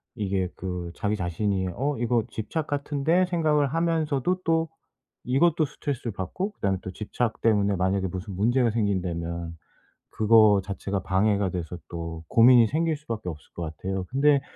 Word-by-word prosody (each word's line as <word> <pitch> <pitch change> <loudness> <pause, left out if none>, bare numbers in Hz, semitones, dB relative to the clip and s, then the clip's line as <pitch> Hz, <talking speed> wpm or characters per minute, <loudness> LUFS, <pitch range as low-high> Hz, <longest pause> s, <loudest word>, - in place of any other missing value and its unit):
이게 95 -4 -1
그 90 -2 -5
자기 105 +1 -1
자신이 95 +1 -1
'어 140 +5 -1
이거 120 -1 +1
집착 155 +8 -4
같은데?' 145 +5 +1
생각을 155 -5 +2
하면서도 165 +1 0
또 165 -1 +2 0.6
이것도 155 +5 +3
스트레스를 140 -4 -4
받고 180 - -3
그다음에 95 -1 -1
또 95 - -5
집착 110 +3 -3
때문에 100 -3 +3
만약에 95 +1 +1
무슨 95 +2 -6
문제가 120 +5 +2
생긴다면 85 -6 -2 0.5
그거 110 -2 +5
자체가 100 0 -3
방해가 100 0 +2
돼서 90 -1 -5
또 85 -1 -6
고민이 120 0 +7
생길 160 +2 0
수밖에 115 -10 -5
없을 75 -4 -10
것 85 - -5
같아요. 95 +2 -3
근데 140 +1 +3
110 Hz, 340 characters per minute, -26 LUFS, 95-145 Hz, 0.6 s, 고민이